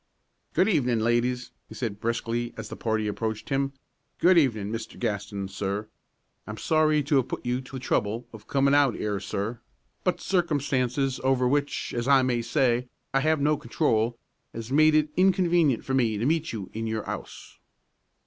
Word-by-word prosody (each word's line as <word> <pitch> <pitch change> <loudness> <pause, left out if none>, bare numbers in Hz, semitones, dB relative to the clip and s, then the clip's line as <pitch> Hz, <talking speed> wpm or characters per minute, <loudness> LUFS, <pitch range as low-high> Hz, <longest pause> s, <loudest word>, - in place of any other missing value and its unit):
"Good 190 - +4
evenin', 125 - +2
ladies!" 120 +2 0 0.2
he - - -10
said 110 -5 -4
briskly, 115 +1 -2
as 110 -2 -6
the - - -6
party 110 -2 -1
approached 110 +1 -3
him. 135 0 0 0.5
"Good 185 +1 +5
evenin', 110 -10 +2
Mr. 115 0 -6
Gaston, 105 -3 -3
sir. 100 +2 -3 0.6
I'm 105 0 -6
sorry 155 0 +2
to 140 0 +3
'ave 125 - -2
put - - -5
you 125 +1 0
to 130 - -15
the 130 - -4
trouble 115 -1 -1
of 105 -2 -12
comin' 140 0 +2
out 145 -5 +4
'ere, 105 -2 -2
sir, 105 +5 -3 0.4
but - - 0
circumstances 140 -7 0
over 130 -1 +3
which, 145 +2 -1
as 120 +1 -2
I 135 -2 +6
may 125 -2 +1
say, 125 -1 +1 0.2
I 135 - +4
have 155 +2 +2
no 150 +1 +2
control 115 -1 0 0.4
has 115 +2 -6
made 155 +2 +5
it 155 0 +3
inconwenient 175 -7 +3
for 135 - -2
me 115 -5 +2
to 110 - -1
meet 160 +2 +1
you 100 -5 -6
in 115 +1 -3
your 110 -1 -3
'ouse." - - -7
125 Hz, 175 wpm, -26 LUFS, 110-145 Hz, 0.6 s, I